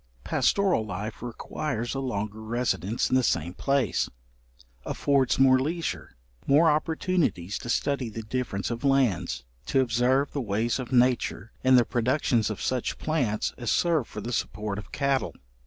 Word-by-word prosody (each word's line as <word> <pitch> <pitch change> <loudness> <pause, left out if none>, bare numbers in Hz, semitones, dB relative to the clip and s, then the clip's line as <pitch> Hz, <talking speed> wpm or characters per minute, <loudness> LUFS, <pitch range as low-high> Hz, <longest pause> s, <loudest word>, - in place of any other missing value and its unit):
Pastoral 195 - +2
life 105 +1 -5
requires 120 +1 -4
a 135 - -2
longer 110 -4 -3
residence 115 -1 -1
in - - +4
the 130 - +5
same 85 -7 0
place, 135 -2 0 0.7
affords 140 -3 +1
more 130 -1 +6
leisure, 165 +5 -3 0.3
more 155 +3 +5
opportunities 155 - 0
to 120 - -7
study 135 0 0
the 110 +1 -6
difference 110 -2 -3
of 120 +2 -4
lands, 135 - +1 0.2
to 135 - +2
observe 130 +3 +2
the 140 - -2
ways 115 +3 0
of 130 -1 -6
nature 125 -3 +2
in 130 0 +6
the 120 -2 +6
productions 120 -2 +1
of 105 - -5
such 130 -2 -1
plants 130 -10 -1
as 120 -3 -2
serve 165 -8 +2
for 105 - -7
the 120 +4 -4
support 105 -2 -2
of 105 - -11
cattle. 140 -1 0
125 Hz, 155 wpm, -27 LUFS, 110-140 Hz, 0.7 s, more